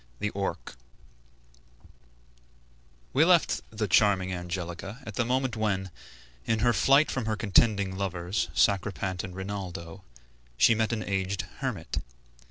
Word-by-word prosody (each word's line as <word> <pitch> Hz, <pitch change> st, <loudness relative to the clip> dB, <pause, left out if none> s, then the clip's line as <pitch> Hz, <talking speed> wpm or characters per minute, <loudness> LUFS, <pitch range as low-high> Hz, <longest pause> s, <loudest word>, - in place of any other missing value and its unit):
THE 105 Hz, -, -2 dB
ORC 100 Hz, 0 st, -4 dB, 2.4 s
We 145 Hz, -, +5 dB
left 175 Hz, -1 st, +4 dB
the 110 Hz, -1 st, -2 dB
charming 95 Hz, -2 st, +3 dB
Angelica 90 Hz, +3 st, -5 dB
at 110 Hz, -, -7 dB
the 120 Hz, -, +1 dB
moment 130 Hz, 0 st, 0 dB
when, 100 Hz, -4 st, -1 dB, 0.5 s
in 110 Hz, -, +1 dB
her 120 Hz, 0 st, +4 dB
flight 140 Hz, +7 st, +4 dB
from 125 Hz, -4 st, -2 dB
her 110 Hz, -, 0 dB
contending 100 Hz, -2 st, +2 dB
lovers, 95 Hz, 0 st, -2 dB
Sacripant 95 Hz, -2 st, +1 dB
and 90 Hz, -2 st, -7 dB
Rinaldo, 95 Hz, -4 st, -6 dB, 0.5 s
she 115 Hz, -, +6 dB
met 110 Hz, 0 st, 0 dB
an 110 Hz, -2 st, -2 dB
aged 95 Hz, -1 st, -1 dB, 0.2 s
hermit. 120 Hz, -12 st, -3 dB
100 Hz, 125 wpm, -28 LUFS, 95-110 Hz, 2.4 s, she